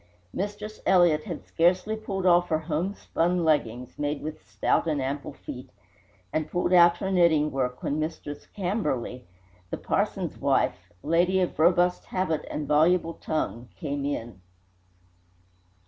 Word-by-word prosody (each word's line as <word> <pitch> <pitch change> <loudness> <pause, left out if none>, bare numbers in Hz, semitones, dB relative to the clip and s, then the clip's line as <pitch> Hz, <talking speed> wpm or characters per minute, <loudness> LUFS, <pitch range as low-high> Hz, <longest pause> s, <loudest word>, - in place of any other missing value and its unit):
Mistress 210 +2 -5
Elliott 175 -5 +4
had - - -6
scarcely 180 +5 +2
pulled 195 -3 -4
off 175 0 +4
her 155 - +2
homespun 170 +2 -1
leggings 125 -6 0
(made 145 0 -2
with 155 0 -6
stout - - +1
and 150 -3 0
ample 140 +2 -3
feet) - - -9 0.6
and 155 0 -1
pulled 175 0 0
out 175 -1 +7
her 190 +2 -3
knitting 160 -5 +4
work, 125 -2 -2
when 145 - -1
Mistress 155 -2 -5
Camberly, 150 - -2 0.4
the - - -3
parson's - - -1
wife, - - +1
a - - -9
lady 175 +4 +3
of 180 -3 -1
robust 175 +2 +3
habit 165 -5 -2
and 150 -1 -4
voluble 165 +3 +3
tongue, 125 -8 -3
came 145 -2 -3
in. 120 -8 -4
165 Hz, 140 wpm, -26 LUFS, 145-180 Hz, 0.6 s, out